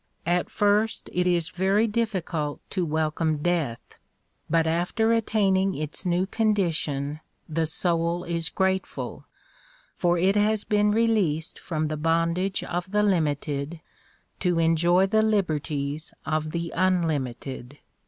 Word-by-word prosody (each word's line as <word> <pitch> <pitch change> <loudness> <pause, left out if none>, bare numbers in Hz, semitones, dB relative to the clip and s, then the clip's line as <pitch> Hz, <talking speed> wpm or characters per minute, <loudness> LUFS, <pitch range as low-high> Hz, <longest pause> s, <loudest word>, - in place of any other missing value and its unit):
At 175 +1 +1
first 210 +1 +1
it 180 0 +1
is 170 -2 +1
very 195 +4 +2
difficult 185 -9 -2
to 180 -4 -1
welcome 155 0 0
death, 165 -10 -2 0.5
but 165 0 +3
after 180 +8 +1
attaining 195 -4 +2
its 155 +4 -4
new 175 +1 +2
condition 165 -9 0 0.3
the 160 0 0
soul 170 +1 0
is 170 -1 -1
grateful 190 0 -2 0.7
for 175 -1 +2
it 190 +4 +3
has 210 0 +2
been 210 0 +2
released 210 -8 +1
from 155 -2 -2
the 155 0 -3
bondage 165 +4 0
of 180 +1 -3
the 210 +1 +2
limited, 150 -4 0 0.6
to 180 -2 +1
enjoy 170 +3 +4
the 220 +3 +2
liberties 155 -8 -1
of 155 0 -1
the 170 +1 -4
unlimited. 145 -7 -1
175 Hz, 125 wpm, -26 LUFS, 155-195 Hz, 0.7 s, enjoy